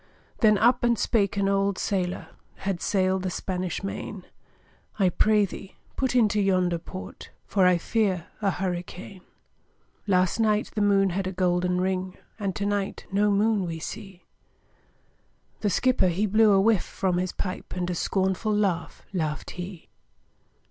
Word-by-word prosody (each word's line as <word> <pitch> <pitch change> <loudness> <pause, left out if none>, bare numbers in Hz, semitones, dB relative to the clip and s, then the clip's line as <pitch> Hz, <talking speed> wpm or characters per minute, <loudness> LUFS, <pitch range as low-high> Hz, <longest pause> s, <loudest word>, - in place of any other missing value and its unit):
Then 215 -3 +5
up 240 +4 +3
and 240 -1 +3
spake 205 -3 +1
an 200 -1 +2
old 195 0 +1
sailòr, 185 -2 -2 0.3
Had 190 -3 -3
sail'd 190 -1 +1
the 185 - -2
Spanish 185 0 -3
Main, 195 -1 -5 0.7
'I 195 -3 +3
pray 210 +3 +3
thee, 195 0 -10 0.2
put 260 -2 -1
into 210 -3 +3
yonder 185 -3 +2
port, 185 +3 -9 0.2
For 190 -2 +3
I 180 -1 +4
fear 190 -2 0 0.2
a 200 - +2
hurricane. 185 +1 -4 0.9
'Last 185 +1 +2
night, 215 -1 +1
the 215 - -1
moon 195 -2 +3
had 190 +1 -2
a - - -2
golden 180 -1 +1
ring, 185 0 -2 0.2
And 195 -3 -2
to 200 - -2
night 205 -1 -2
no 205 +2 +3
moon 205 0 +2
we 165 -1 -4
see!' 195 +2 -8 1.4
The 210 - 0
skipper, 255 +1 +2
he 180 +4 +1
blew 215 +1 +4
a 195 - +5
whiff 210 -1 +4
from 185 -2 -1
his 185 0 -1
pipe, 185 0 -5
And 180 -1 -2
a 180 - -1
scornful 190 +4 0
laugh 195 -5 -1
laughed 155 -5 -2
he. 180 -1 -8
195 Hz, 155 wpm, -26 LUFS, 180-210 Hz, 1.4 s, Then